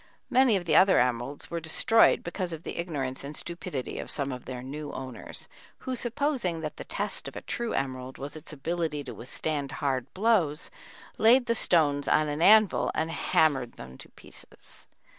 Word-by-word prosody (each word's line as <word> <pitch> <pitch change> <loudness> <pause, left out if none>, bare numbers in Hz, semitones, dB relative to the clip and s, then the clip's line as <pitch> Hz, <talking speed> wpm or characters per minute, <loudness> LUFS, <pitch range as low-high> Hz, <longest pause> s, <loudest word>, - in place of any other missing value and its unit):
Many 255 -3 +5
of 180 -2 -1
the - - +2
other 190 0 +6
emeralds 125 +3 -1
were 170 - -2
destroyed 165 +8 +4
because 175 +1 -4
of 165 0 -7
the - - -6
ignorance 140 -7 -3
and 145 +2 -7
stupidity 170 -6 -5
of - - -6
some 140 -2 -2
of 125 -1 -7
their 125 -1 -6
new 145 +3 -6
owners, 130 -3 -8 0.3
who, 260 - -4
supposing 240 - -1
that 155 -1 -5
the - - -6
test - - -3
of - - -9
a - - -5
true 235 -1 -3
emerald 130 -1 -3
was 140 +2 -7
its 155 - -8
ability 155 0 -2
to - - -7
withstand 140 +2 -4
hard 135 -3 -2
blows, 185 -8 +1 0.5
laid 245 +3 +6
the 230 - +1
stones 150 -9 +2
on 155 -1 +3
an 145 +2 -3
anvil 215 +2 +5
and 160 +1 -1
hammered 135 -7 +1
them 65 0 -11
to - - -12
pieces. - - -14
155 Hz, 180 wpm, -28 LUFS, 135-185 Hz, 0.5 s, other